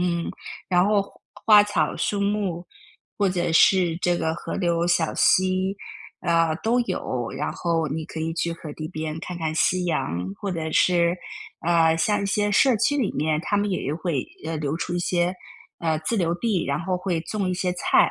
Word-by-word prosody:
嗯， 170 -1 -1 0.4
然 180 0 +3
后 205 -1 +3
花 - - -16 0.4
花 205 - +8
草 170 -7 0
树 205 -1 -1
木 200 -4 -1 0.5
或 200 -2 +3
者 175 -2 -1
是 170 0 +4
这 175 -1 +1
个 160 -1 -1
河 - - -6
流 170 -2 +1
小 175 -2 +1
溪， 185 +1 +2 0.4
啊， 165 -1 +2
都 235 +6 +1
有， 130 - -3
然 145 - -2
后 165 -2 -1
你 160 +3 -3
可 160 - -8
以 160 +1 -2
去 170 0 -1
河 160 -2 -8
堤 155 0 -6
边 155 -2 -4
看 180 - -6
看 155 -1 -2
夕 180 +3 +2
阳 90 - -2
或 200 - -3
者 160 -3 -3
是， 170 +1 +3 0.5
呃， 165 -1 +3
像 205 +4 +1
一 - - -1
些 205 +1 +1
社 245 +4 +4
区 285 +7 +1
里 255 -8 +1
面， 155 0 0
它 205 - 0
们 205 0 0
也 185 - -2
有 145 +3 -2
会， 165 -6 -2 0.2
呃， 160 0 -2
流 150 0 -2
出 175 +1 -3
一 175 - 0
些， 175 +1 0 0.4
呃， 160 -2 0
自 220 +9 -1
留 170 -3 +1
地， 195 -1 0
然 140 +4 -1
后 185 +1 -1
会 180 -2 -2
种 200 -2 -2
一 - - -1
些 180 0 -1
菜。 180 - +3
175 Hz, 215 characters per minute, -24 LUFS, 160-190 Hz, 0.5 s, 花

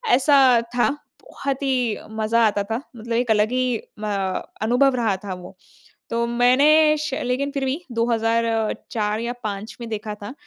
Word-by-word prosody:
ऐसा 280 +2 +4 0.4
था। 245 +3 +3 0.3
बहुत 275 -1 -4
ही 250 -5 0
मज़ा 220 +1 +2
आता 205 -1 0
था 230 +4 -1 0.2
मतलब 230 +1 -5
एक 240 -1 +1
अलग 210 +1 +3
ही 255 0 +1 0.4
म 200 -3 -2 0.2
अनुभव 255 +3 +3
रहा 225 -5 +1
था 195 - -3
वो। 180 +1 -11 0.5
तो 235 0 0
मैंने 285 +6 +4
श 290 -3 -3
लेकिन 265 +3 -1
फिर 275 -2 -2
भी 265 +4 -1
2004 225 -2 0
या 235 +1 -2
5 210 +1 -5
में 230 - -6
देखा 215 -1 -4
था, 205 +3 -8
230 Hz, 160 wpm, -22 LUFS, 215-255 Hz, 0.5 s, ऐसा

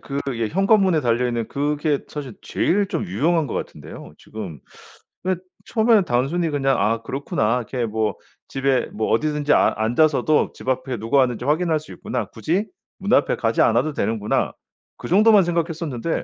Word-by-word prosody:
그 140 0 -5 0.2
예 115 -2 -1
현관문에 195 - +3
달려 120 0 +1
있는 120 -2 -2
그게 145 +1 0
사실 140 -7 -7
제일 200 +2 0
좀 - - -2
유용한 150 - +1
것 - - -6
같은데요. - - -7
지금 95 -9 -8 0.7
근데 185 -1 -1 0.2
처음에는 220 -3 +3
단순히 155 +6 0
그냥 135 -2 +1
'아 110 +3 +1
그렇구나 125 - -1
이렇게 120 0 -3
뭐 110 -1 -1 0.3
집에 135 -1 0
뭐 110 +1 -2
어디든지 150 +4 +1
아 - - +4
앉아서도 140 +6 +2
집 130 - -7
앞에 130 -1 -1
누가 115 +6 0
왔는지 125 -3 +2
확인할 160 +3 +1
수 - - -14
있구나. 120 -4 -4
굳이 165 - -1 0.3
문 - - -4
앞에 - - +3
가지 - - 0
않아도 155 - +3
되는구나.' 110 -3 -1 0.4
그 - - -8
정도만 210 +2 +6
생각했었는데 165 -4 -2
140 Hz, 360 characters per minute, -22 LUFS, 115-165 Hz, 0.7 s, 정도만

